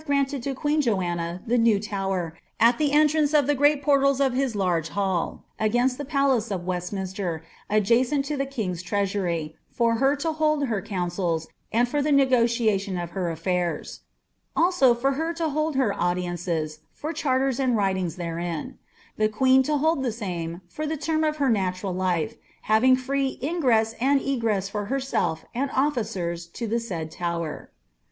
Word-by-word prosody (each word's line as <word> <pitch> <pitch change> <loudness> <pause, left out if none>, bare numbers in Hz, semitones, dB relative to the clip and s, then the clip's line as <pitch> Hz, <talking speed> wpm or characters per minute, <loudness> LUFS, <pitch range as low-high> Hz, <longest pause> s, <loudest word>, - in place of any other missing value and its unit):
granted 280 -1 +1
to 270 +2 -3
queen 300 +3 +1
Joanna 175 -7 -1
tlie 240 +1 +2
new 230 -3 +4
tower, 195 -5 -3 0.2
M 230 +2 +6
the 300 -2 +2
riitr&nce 300 0 +4
of 290 - +3
the 290 - +2
great 290 +1 +3
portals 275 -1 +3
of 270 -2 +2
his 260 -3 0
large 175 -5 0
hall, 190 -3 -1 0.2
against 245 +4 +1
the 290 - -3
palsca 270 -5 +1
of 175 -1 -6
Westminster, 180 -2 -3 0.3
adjacent 240 +7 +2
to 300 +1 -2
tlie 275 -1 -2
king's 195 -10 -3
treasury, 180 -5 -1
for 230 -1 +1
her 270 +3 +3
to 320 +3 -1
hold 305 -2 +1
her 220 -6 -1
councils, 175 -4 -2 0.2
and 240 +2 +3
for 290 +4 0
the 300 +1 0
negotiation 235 -7 +2
of 175 -1 -4
her 185 -3 -2
a&irs; 170 0 -2 0.6
also, 330 -8 +4
for 265 +4 +1
her 320 +5 -1
to 325 -1 -1
hold 305 +1 -1
her 255 -7 +2
■ndi»nce>s 175 -3 -2
for 310 +2 -5
charters 270 -4 0
and 255 -4 +2
writings 190 -4 0
theiein; 170 -2 -4 0.4
the 215 0 +2
queen 260 +4 +4
to 295 +3 +1
hold 315 0 +2
the 260 - 0
Mme, 170 -4 -4
for 305 - -5
the 315 +1 -2
term 315 +2 0
of 305 0 0
her 275 -4 +2
natural 190 -2 -1
life, 185 +2 0 0.3
having 230 +5 +5
free 270 +1 -1
ingress 250 -7 +1
and 275 +3 +3
egress 230 -8 0
for 205 0 -4
bcnelf 265 -11 -1
and 270 +3 -1
officers 195 - -1
to 230 +7 -6
the 230 +2 0
said 170 -9 -5
tower.' 170 -2 -4
230 Hz, 170 wpm, -25 LUFS, 180-275 Hz, 0.6 s, M